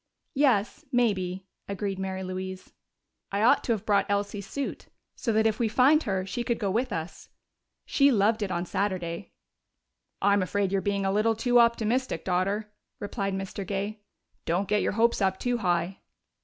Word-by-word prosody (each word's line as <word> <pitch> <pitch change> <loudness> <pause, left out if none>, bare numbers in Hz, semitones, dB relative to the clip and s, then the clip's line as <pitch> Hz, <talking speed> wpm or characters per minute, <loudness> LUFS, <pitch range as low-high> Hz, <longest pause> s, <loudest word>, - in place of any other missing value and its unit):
"Yes, 255 -7 +2
maybe," 190 -7 0 0.2
agreed 200 -1 -3
Mary 190 0 -3
Louise. 185 0 -6 0.6
"I 200 +2 0
ought 235 - +5
to - - 0
have 215 -1 -4
brought 205 -2 +2
Elsie's 200 0 -2
suit, 280 -1 -4 0.3
so 230 - -1
that 220 0 +2
if 220 -1 +1
we 235 - +2
find 265 +8 +4
her 190 -6 -1
she 220 +5 -3
could 235 0 0
go 200 -4 -1
with 235 +6 0
us. 160 0 -5 0.6
She 280 0 +4
loved 220 0 +2
it 205 - -1
on 175 -1 -2
Saturday." 185 -2 -3 0.9
"I'm 200 0 +3
afraid 195 +1 0
you're 195 -1 +1
being 200 -1 -1
a 195 - +2
little 215 +3 +2
too 245 +2 +3
optimistic, 235 +2 +1
Daughter," 195 +4 -1 0.3
replied 195 -1 -3
Mr. 195 +1 -4
Gay. 200 +3 -3 0.5
"Don't 180 +4 0
get 210 0 +2
your - - 0
hopes 230 +1 +2
up 190 -1 +2
too 245 +2 -1
high." 175 -1 0
200 Hz, 170 wpm, -27 LUFS, 190-225 Hz, 0.9 s, ought